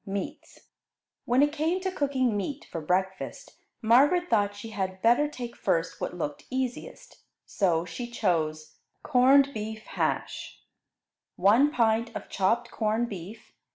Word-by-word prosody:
MEATS 195 0 -6 0.6
When 250 +4 +4
it 290 - +2
came 320 +4 0
to 375 0 -2
cooking 265 - 0
meat 270 +9 -4
for 165 - -4
breakfast, 190 +4 -2 0.3
Margaret 290 +11 +4
thought 205 -2 +2
she 210 +2 -8
had 190 -2 -3
better 240 +6 +4
take 245 -5 -7
first 165 +1 -1
what 180 - -3
looked 145 -4 -4
easiest, 260 - -5 0.3
so 175 -4 +1
she 240 +8 -6
chose 155 -8 -1 0.3
Corned 275 +1 +5
Beef 220 0 -5
Hash - - -3 0.8
1 225 +10 +5
pint 230 -4 +1
of - - -6
chopped 230 +5 0
corned 225 +2 0
beef. 195 +3 -9
225 Hz, 135 wpm, -27 LUFS, 190-265 Hz, 0.8 s, Corned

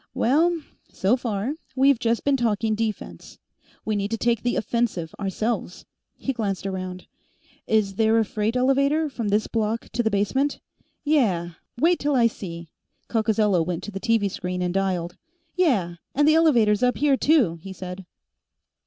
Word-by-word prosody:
"Well, 330 +7 +2 0.3
so 195 +6 +1
far, 240 +3 -3 0.2
we've 270 -1 +4
just 230 -1 0
been 280 -1 +3
talking 225 -3 0
defense. 215 -1 -4 0.5
We 215 - 0
need 200 0 -1
to 225 - -2
take 235 -1 +1
the 245 - 0
offensive, 215 -9 -1
ourselves." 205 -1 -3 0.3
He 270 - -2
glanced 205 -5 -3
around. 185 -1 -5 0.6
"Is 205 -3 +1
there 225 0 +3
a 225 - +3
freight 215 +3 -2
elevator 275 +4 +2
from 235 -4 -3
this 210 +1 +1
block 225 0 -2
to 240 - -1
the 225 - +1
basement?" 240 +8 0 0.4
"Yeah. 210 - +1 0.3
Wait 335 +7 +3
till 290 -1 0
I 240 -2 +4
see." 170 -7 -4 0.4
Coccozello 215 -5 +2
went 175 +1 -4
to 210 - -6
the 195 - -5
TV 225 -2 +2
screen 180 0 -3
and 175 -1 -1
dialed. 185 -3 -1 0.4
"Yeah, 215 - +1 0.2
and 290 +2 +3
the 310 - +6
elevator's 240 -11 +4
up 250 -3 +2
here, 285 +1 +3
too," 260 - +3
he 190 +4 -10
said. 185 0 -7
220 Hz, 160 wpm, -24 LUFS, 195-255 Hz, 0.6 s, the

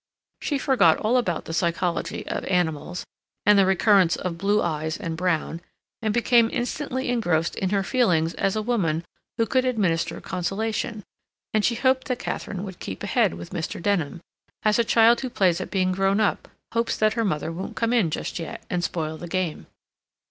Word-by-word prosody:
She 290 - 0
forgot 235 - +4
all 225 +3 +1
about 205 -10 0
the 165 - -5
psychology 170 +1 -1
of - - -3
animals, 175 -1 -1 0.4
and 210 - +7
the 195 - +5
recurrence 190 -2 +4
of 180 -2 -3
blue 205 +2 +2
eyes 160 -3 -1
and 165 -6 -4
brown, 170 -1 -1 0.4
and 220 -2 0
became 235 0 +4
instantly 260 +1 -2
engrossed 175 -9 +1
in 190 - -1
her 195 0 +1
feelings 175 -9 +2
as 195 - 0
a 215 - -1
woman 175 -9 0 0.3
who 230 - +2
could 255 +3 +2
administer 200 -10 0
consolation, 210 +4 -3 0.5
and 215 -1 +2
she 235 - +2
hoped 260 +2 +2
that 250 -2 -1
Katharine 190 -4 -4
would 190 -3 -8
keep 95 - -6
ahead - - +2
with 85 +1 -9
Mr. 165 -2 -4
Denham, 170 -4 -1 0.4
as 215 +1 +3
a - - +5
child 230 +1 +5
who 260 - -3
plays 185 -6 +2
at - - -5
being 185 -1 +1
grown 195 +2 +2
up 215 - 0 0.3
hopes 230 0 0
that 215 0 +3
her 230 - 0
mother 160 -5 -1
won't 180 +3 -6
come 230 +1 0
in 220 -9 +3
just 155 - -4
yet, 165 - -6
and 175 -1 0
spoil 160 -2 -2
the 175 - -8
game. 180 -2 -2
195 Hz, 185 wpm, -24 LUFS, 170-225 Hz, 0.5 s, and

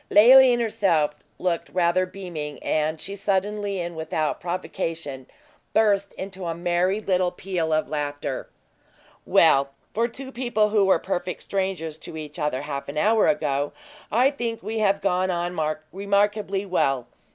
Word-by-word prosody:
Leoline 250 +3 +8
herself 200 -10 +2 0.3
looked 175 -2 -1
rather 180 +1 +2
beaming; 170 -6 -6
and 155 +1 0
she 195 - -5
suddenly, 200 0 -1
and 175 -1 -4
without 160 -1 -2
provocation, 165 -6 -4 0.5
burst 200 -2 +3
into 190 -1 -6
a 165 - -2
merry 175 +3 +1
little 185 -3 +1
peal 175 -3 -2
of 155 0 +1
laughter. 145 -3 -3 0.8
"Well, 140 0 +5 0.2
for 230 +2 +1
two 260 +2 -9
people 240 -4 +1
who 210 -2 +3
were 190 - +5
perfect 180 -1 -3
strangers 185 -5 -2
to 160 - -9
each 155 +1 -8
other 150 -3 -1
half 140 -1 -5
an 145 - -6
hour 215 +6 +4
ago, 145 -7 0 0.4
I 250 +6 +4
think 235 -6 -4
we 220 +2 -3
have 200 -2 +2
gone 185 -1 +1
on 175 0 -1 0.4
remarkably 200 0 0
well. 135 -9 +1
185 Hz, 145 wpm, -24 LUFS, 160-205 Hz, 0.8 s, Leoline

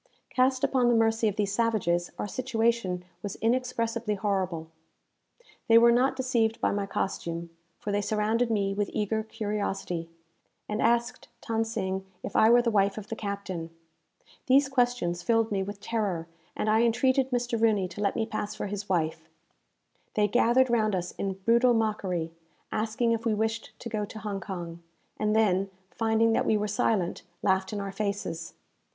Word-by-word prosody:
Cast 255 0 +2
upon 255 -2 +3
the 240 - +4
mercy 225 0 +3
of 205 - -1
these 205 -2 0
savages, 185 -7 +1
our - - -3
situation 225 -6 0 0.2
was 200 -2 -5
inexpressibly 230 -2 0
horrible. 190 -5 -1 1.0
They 230 - +7
were 235 +1 +7
not 255 +3 +3
deceived 235 -4 +1
by - - +1
my 200 0 -1
costume; 170 -3 -3 0.3
for 205 - -4
they 205 0 +1
surrounded 220 +3 +1
me 200 -3 +1
with 205 0 -1
eager 215 +1 0
curiosity, 205 -6 -3 0.6
and 210 +1 -2
asked 235 0 +1 0.2
Than 225 -1 +1
Sing 190 -4 -3 0.2
if - - -6
I 220 - +6
were 240 +1 +6
the 235 - +1
wife 200 -1 +2
of 210 -1 -7
the 225 - -3
captain. 200 -6 -4 0.8
These 270 +1 +5
questions 245 -10 +1
filled 225 +3 +2
me 195 -2 0
with 200 +1 -5
terror, 200 -7 -2 0.3
and - - -1
I 220 +1 +4
entreated 255 +3 +2
Mr. 240 -2 -1
Rooney 210 -5 +3
to 205 - -7
let 200 - +1
me 220 - 0
pass 215 -1 -4
for - - -4
his 205 0 -5
wife. 160 -2 -1 0.9
They 210 -1 +3
gathered 245 +3 +3
round 215 -4 +2
us 180 -1 -3
in 195 -1 -3
brutal 235 +5 +3
mockery, 190 -7 -1 0.4
asking 225 +2 0
if 230 0 0
we 225 -2 +1
wished 220 +1 -2
to - - -7
go 215 -2 -2
to 215 - -10
Hong 210 -2 -4
Kong; 170 -4 -6 0.4
and 210 0 +1
then, 195 -3 +2 0.2
finding 225 0 +2
that - - +1
we 215 - +3
were 210 0 -1
silent, 210 -4 0 0.2
laughed 190 -1 +2
in 210 - -3
our 200 -1 -4
faces. 195 -5 -3
215 Hz, 170 wpm, -28 LUFS, 195-230 Hz, 1.0 s, They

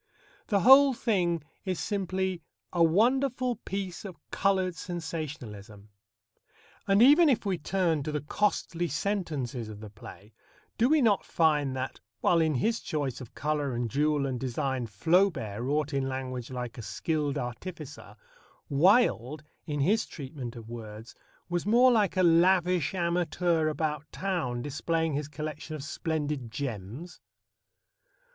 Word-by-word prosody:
The 200 -3 +2
whole 270 +4 +8
thing 175 -9 0 0.2
is 185 -3 -2
simply 190 -3 -2 0.3
a 170 -1 +4
wonderful 250 +7 +2
piece 190 -3 -5
of 190 -6 -8
coloured 190 -2 +1
sensationalism. 140 - -6 1.0
And 195 +3 +5
even 300 +5 +7
if 235 -5 +1
we 190 -4 -1
turn 170 -2 0
to 150 - -3
the 150 -1 -2
costly 175 0 -1
sentences 145 - -2
of 105 -1 -9
the 105 -1 -10
play, 105 0 -13 0.4
do 235 +3 +3
we 305 -2 +4
not 210 -4 +3
find 150 -5 +1
that, 130 0 -4 0.2
while 170 -1 +3
in 160 -2 +1
his 225 - +1
choice 140 -5 -3
of 125 - -11
colour 145 -3 -1
and 120 -2 -2
jewel 150 0 +1
and 130 -2 -2
design 130 -1 -2
Flaubert 115 - +1
wrought 145 +3 -1
in 135 -1 0
language 130 -2 -4
like 125 -2 -5
a - - -4
skilled 150 +5 -2
artificer, 145 +4 -7 0.5
Wilde, 155 - +3 0.2
in 145 -2 -2
his 210 +10 +2
treatment 130 -4 -7
of 115 -2 -10
words, 110 -1 -9 0.3
was 175 +2 -2
more 245 +4 +6
like 210 -6 +2
a 185 - +4
lavish 180 +1 +3
amateur 170 -2 +1
about 150 -1 -2
town 160 -11 -2
displaying 160 +3 -1
his 145 +1 -2
collection 155 +1 -6
of 145 - -7
splendid 150 -4 -3
gems? 120 - -6
155 Hz, 140 wpm, -28 LUFS, 130-185 Hz, 1.0 s, whole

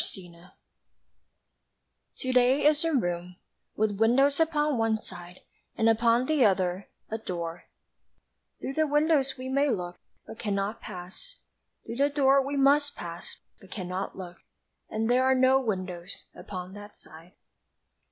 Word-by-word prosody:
To - - -3 0.2
Day 170 +2 -17 1.7
TO 255 0 -3
DAY 255 +3 +4
is 300 +1 +4
a 330 - +1
room 175 - -1 0.4
With 210 -2 0
windows 270 +6 +4
upon 300 -4 +1
one 225 -1 +1
side 180 -2 -9 0.4
And 225 - +3
upon 230 +2 +3
the 305 -2 +2
other 190 -2 +1 0.2
A 220 - -2
door 170 -4 -5 0.9
Through 270 - -4
the 315 +2 +1
windows 295 -2 +2
we 255 0 -6
may 275 +2 +2
look 180 -6 -3 0.3
But 220 - -11
cannot 205 0 -2
pass; 185 - -10 0.5
Through 230 - -6
the 280 +1 +3
door 275 -1 +4
we 280 +1 -3
must 285 +1 +3
pass 170 0 -8 0.2
But 190 - -17
cannot 185 0 -5
look, 175 -2 -8 0.5
And 220 +1 -1
there 250 +2 +3
are 265 0 +4
no 260 +1 +5
windows 185 -5 -4
Upon 185 -1 -8
that 205 0 -11
side. 165 +3 -15
225 Hz, 145 wpm, -28 LUFS, 185-275 Hz, 1.7 s, no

